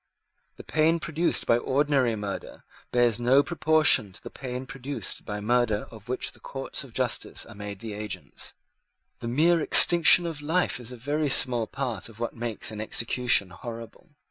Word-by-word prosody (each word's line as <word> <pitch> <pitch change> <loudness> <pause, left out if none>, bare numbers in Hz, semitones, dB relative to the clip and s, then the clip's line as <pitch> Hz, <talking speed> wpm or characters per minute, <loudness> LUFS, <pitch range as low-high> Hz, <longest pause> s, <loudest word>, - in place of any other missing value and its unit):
The - - -11
pain 160 +2 +1
produced 165 +2 -1
by 115 - +3
ordinary 135 -2 +1
murder 100 -2 -7 0.3
bears 120 -2 +2
no 130 +4 +4
proportion 155 - +3
to - - -15
the - - -9
pain 130 -1 -6
produced 135 +1 -5
by 105 -1 -5
murder 115 -1 +1
of 110 0 -14
which 125 - -3
the - - -18
courts 135 0 -5
of 135 - -13
justice - - -2
are - - -12
made 100 -1 -8
the 110 -2 -6
agents. 105 -3 -6 0.7
The - - -6
mere 160 +7 +3
extinction 170 +2 +7
of 160 -3 -5
life 160 -4 0
is 120 0 -6
a 125 - -9
very 145 +4 -1
small 120 -4 +2
part 120 -6 -4
of 115 0 -16
what 120 - -4
makes 115 -2 -4
an 105 -1 -6
execution 115 -3 +2
horrible. 115 - -10
125 Hz, 170 wpm, -26 LUFS, 110-145 Hz, 0.7 s, extinction